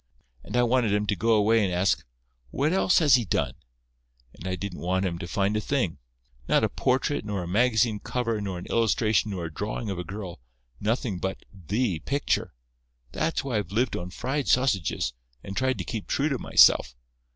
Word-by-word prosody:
And - - -4
I 120 - +4
wanted 120 -4 +2
'em 105 0 0
to 100 - 0
go 115 +6 +2
away 110 +1 +4
and 95 - 0
ask, 90 +1 +1 0.5
'What 145 - 0
else 185 -1 +3
has 150 -5 +5
he 120 -1 +5
done?' 95 - -1 0.8
And 90 - -9
I 95 - -1
didn't 95 0 -6
want 95 +2 0
'em 85 -2 -2
to 85 - -5
find 100 +3 0
a 105 - 0
thing; 120 - -1 0.5
not - - +3
a - - +2
portrait 130 +2 0
nor 100 -3 -3
a - - -6
magazine 110 +1 +2
cover 115 -3 -2
nor 95 -3 -4
an 90 - -7
illustration 110 -1 +2
nor 90 -4 -4
a 80 - -7
drawing 105 +3 -3
of 95 - -4
a - - -3
girl—nothing 90 - -5
but 95 +1 -4
the 100 - -1
picture. 140 - -1 0.6
That's 160 - -1
why 130 -5 -1
I've 95 -4 -6
lived 115 +2 +1
on 90 +1 -4
fried 135 +8 -3
sausages, 100 - +1 0.3
and 100 - -7
tried 130 +2 +1
to - - -3
keep 110 -4 -5
true 145 +3 +1
to 135 -4 -1
myself. - - +5
105 Hz, 195 wpm, -26 LUFS, 90-125 Hz, 0.8 s, has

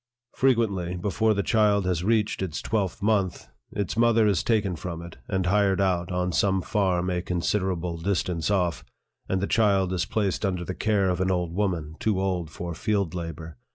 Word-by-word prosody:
Frequently, 105 -9 +1
before 110 +4 +1
the 100 - 0
child 105 -4 +3
has 90 -2 0
reached 105 0 +1
its 90 -5 -3
twelfth 100 -2 -2
month, 100 - 0 0.2
its 100 -2 -3
mother 115 -1 +4
is 100 -5 +2
taken 105 -5 +1
from 85 0 -5
it, 85 -1 -10
and 95 -2 -1
hired 100 0 +2
out 90 -2 +1
on 90 0 0
some 95 +1 +1
farm 95 -4 0
a 90 -1 -1
considerable 90 -1 -1
distance 90 -2 -1
off, 90 -4 0 0.5
and 95 -1 0
the - - +1
child 100 -4 +2
is 90 - 0
placed 100 -3 -1
under 90 -3 -1
the 95 - -3
care 105 -1 +1
of 90 0 -2
an 95 - +1
old 90 -2 -1
woman, 85 -6 -2
too 105 -4 +1
old 90 -4 -1
for 85 +2 -6
field 100 0 -1
labor. 80 -3 -6
95 Hz, 185 wpm, -26 LUFS, 90-105 Hz, 0.5 s, mother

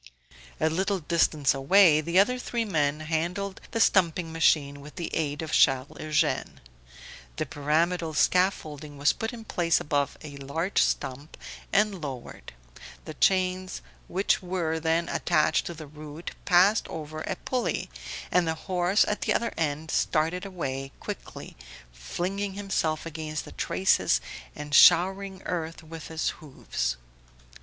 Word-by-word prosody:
A 160 - +2
little 190 +5 0
distance 155 -3 +2
away 155 +3 +5
the 170 +3 -1
other 250 +6 +4
three 235 -2 -2
men 150 -6 0
handled 175 +5 -2
the 230 - -2
stumping 175 -5 +2
machine 145 -3 +2
with 150 +1 -12
the 175 -3 -5
aid 150 0 -1
of 155 - -6
Charles 135 0 +3
Eugene. 155 -1 0 0.8
The - - -2
pyramidal 160 +3 0
scaffolding 155 -5 +1
was 145 +1 +3
put 225 - -4
in 230 -2 -9
place 170 -5 +1
above 145 -1 -1
a 145 -2 -8
large 160 +7 -1
stump 140 +4 -2 0.3
and 200 -3 +2
lowered, 135 -5 -7 0.5
the 155 - -7
chains 185 +2 +1 0.2
which 190 +3 +1
were 175 -3 -2
then 165 +1 +1
attached 155 -3 +1
to 170 - -6
the 155 -1 -9
root 150 +2 -9
passed 190 +4 +4
over 155 0 -6
a 190 - -3
pulley, 250 +6 -2 0.4
and 180 -2 +3
the 160 - 0
horse 180 +3 +2
at 210 - -2
the - - +1
other 235 - -1
end 155 0 -2
started 165 +5 0
away 135 -7 -4
quickly, - - -8 0.4
flinging 185 - -3
himself 175 -6 -1
against 155 -1 -5
the - - -10
traces 185 - +2 0.4
and 150 0 -7
showering 190 +4 +5
earth 165 -2 -4
with 160 0 -9
his 160 -1 -1
hoofs. 130 - -3
160 Hz, 140 wpm, -27 LUFS, 150-185 Hz, 0.8 s, away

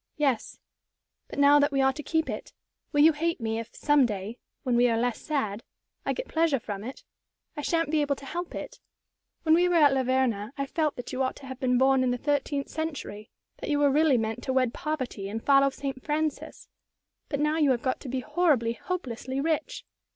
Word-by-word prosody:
"Yes. 275 -7 0 0.7
But - - -9
now 285 +1 +6
that 290 +1 +3
we 275 - 0
are 265 0 +4
to 300 - -6
keep 320 +2 0
it, - - -6 0.4
will 290 - +3
you 320 +2 +7
hate 335 +3 -1
me 225 -1 -2
if, 230 - -8
some 290 -3 +3
day 210 +2 -5 0.2
when 250 -2 +1
we 245 +1 +4
are 230 - +1
less 240 0 -1
sad 230 -9 -2 0.5
I - - +2
get - - -5
pleasure 320 -3 +2
from 205 -3 -6
it? 255 +4 -8 0.5
I 295 - -4
sha'n't 330 0 0
be 310 -1 +2
able 285 -1 +1
to 275 - -12
help 350 +5 -5
it. - - -7 0.6
When 315 - +4
we 355 +2 +4
were 350 - +2
at 295 -4 +6
La 265 - +2
Verna, 250 -4 0
I 275 - -1
felt 305 +1 -1
that 245 - -7
you 255 - -1
ought 260 - 0
to 275 - -12
have 260 -1 -8
been 250 -1 +2
born 265 +1 +4
in 255 - +2
the 245 - 0
thirteenth 285 +1 -1
century, 290 -10 -5 0.3
that - - -6
you 295 - +2
were 290 -1 +4
really 295 -2 +4
meant 225 +1 -2
to 260 - -1
wed 255 -2 +2
poverty 255 -10 -4
and 225 +2 -5
follow 275 0 +5
St. 270 -1 -6
Francis. 305 0 -3 0.6
But 280 - -2
now 300 +1 +1
you 295 -3 +4
have 245 -3 +1
got 255 - 0
to 270 - -8
be 260 +1 -2
horribly, 270 -9 +2
hopelessly 260 -4 -4
rich. 315 +1 -2
275 Hz, 220 wpm, -27 LUFS, 245-300 Hz, 0.7 s, you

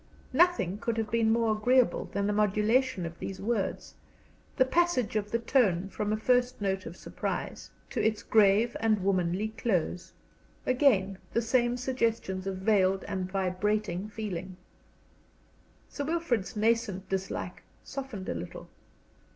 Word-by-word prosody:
Nothing 265 - +3
could 230 0 -2
have 220 -1 -2
been 225 -1 +3
more 225 -1 +2
agreeable 250 +3 +3
than 200 0 -2
the 210 - +1
modulation 210 +1 +2
of 170 0 -7
these 190 - -5
words, 210 -1 -2 0.6
the 260 - +5
passage 260 -7 +1
of 210 -1 -1
the 230 - +1
tone 205 -7 +2
from 210 +1 -2
a 215 - +1
first 250 +2 +2
note 195 -2 -1
of 170 - -9
surprise - - -4 0.2
to - - -1
its 220 -1 +1
grave 215 +2 +4
and 215 -3 +1
womanly 185 +2 +1
close. 190 -6 -2 0.5
Again, 215 -8 +3
the 230 - +2
same 240 +1 +2
suggestions 230 -7 -1
of 190 -1 -2
veiled 190 -1 +2
and 190 -2 -4
vibrating 195 +1 -1
feeling. 190 -4 -5 1.3
Sir 285 - -5
Wilfrid's 285 - -1
nascent 210 -3 0
dislike 190 -1 -4 0.2
softened 265 -9 -6
a - - -1
little. 90 - -7
215 Hz, 140 wpm, -29 LUFS, 190-235 Hz, 1.3 s, the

